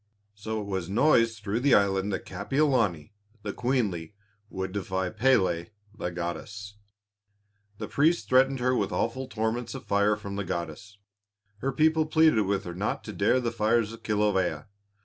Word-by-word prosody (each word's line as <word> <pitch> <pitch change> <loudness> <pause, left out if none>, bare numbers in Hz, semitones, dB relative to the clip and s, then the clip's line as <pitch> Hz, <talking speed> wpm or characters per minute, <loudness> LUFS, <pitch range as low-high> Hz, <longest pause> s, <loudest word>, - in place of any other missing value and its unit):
So 110 +1 -4
it 105 - -5
was 95 -3 -3
noised 115 -2 +3
through 105 +3 -1
the 140 +1 +4
island 100 0 +2
that 95 - -3
Kapiolani, 105 - 0 0.3
the 100 - -4
queenly, 105 -9 -1 0.3
would 95 -2 -4
defy 95 -2 -2
Pélé 100 -8 +2 0.3
the 90 - -3
goddess. 90 +4 -6 1.0
The 105 - -5
priests 160 +4 +2
threatened 135 +1 +4
her 125 +1 +2
with 100 -5 0
awful 115 +8 -2
torments 110 +1 -2
of - - -8
fire 100 +1 +2
from 100 -2 -7
the 100 - -1
goddess; 85 +4 -5 0.6
her 135 +4 -1
people 155 +3 +2
pleaded 155 -10 +4
with 100 0 0
her 90 - -6
not 100 +4 -2
to - - -7
dare 130 - +2
the 120 -2 -1
fires 115 0 +1
of 115 - -11
Kilawea. 105 -2 0
105 Hz, 160 wpm, -27 LUFS, 95-125 Hz, 1.0 s, the